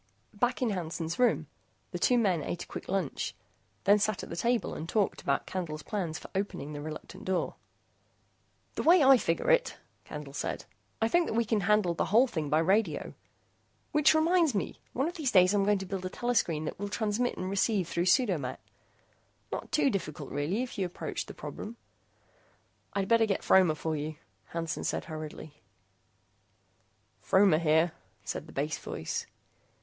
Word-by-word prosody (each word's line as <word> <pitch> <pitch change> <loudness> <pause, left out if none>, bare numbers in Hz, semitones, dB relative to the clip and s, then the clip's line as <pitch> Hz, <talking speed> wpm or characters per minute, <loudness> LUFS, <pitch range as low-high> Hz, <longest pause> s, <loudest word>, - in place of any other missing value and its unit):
Back 245 +5 0
in 235 - +1
Hansen's 170 -1 -3
room, 250 -1 +3 0.5
the - - -4
two 250 - +4
men 190 -8 +2
ate 170 +4 -4
a - - -15
quick - - -8
lunch, 190 -7 -2 0.5
then 205 +2 +5
sat 215 -1 0
at - - -8
the - - -3
table 235 +6 0
and 165 - -6
talked 205 -1 +1
about 140 0 0
Candle's 155 -5 -4
plans 180 -7 -3
for - - -10
opening 190 -6 -3
the 145 - -5
reluctant 155 +6 -8
door. 185 -3 -1 1.2
"The - - -2
way 340 -1 +6
I 270 0 +8
figure 170 - +1
it," - - +2 0.3
Candle - - -8
said, - - -3 0.3
"I 225 - +3
think 345 +7 +3
that - - -2
we 235 0 +2
can 220 -1 +1
handle 210 -4 +3
the - - 0
whole 230 +6 +5
thing 160 - -3
by 150 - +3
radio. 190 +7 +1 0.8
Which 300 +1 +5
reminds 325 -3 +3
me, 195 - -2
one 270 +5 0
of 345 - -4
these 300 -5 0
days 185 -1 +6
I'm 200 -1 +3
going 205 0 +3
to 190 - -5
build 190 0 -4
a 185 - -2
telescreen 185 -10 0
that - - -5
will 205 0 -3
transmit 220 +3 -1
and 185 - -3
receive 195 -1 +1
through 175 +1 -1
pseudo 190 - +3
met. 130 -2 -5 0.9
Not - - -5
too 295 -3 +3
difficult 155 - -4
really 155 - -1
if 250 - -7
you 190 - +1
approach 175 - -5
the - - -9
problem 225 +3 -7 0.6
" - - -37
"I 200 -1 0
better 230 +1 +4
get 195 - -1
Fromer 185 -5 +5
for 160 +1 -2
you," 155 +1 -4 0.3
Hansen 165 -1 -4
said - - -2
hurriedly. 155 -2 -8 1.6
"Fromer 190 -4 +4
here," 160 +1 +3 0.3
said - - -5
the - - -12
bass - - -2
voice. - - -4
195 Hz, 180 wpm, -30 LUFS, 165-230 Hz, 1.6 s, I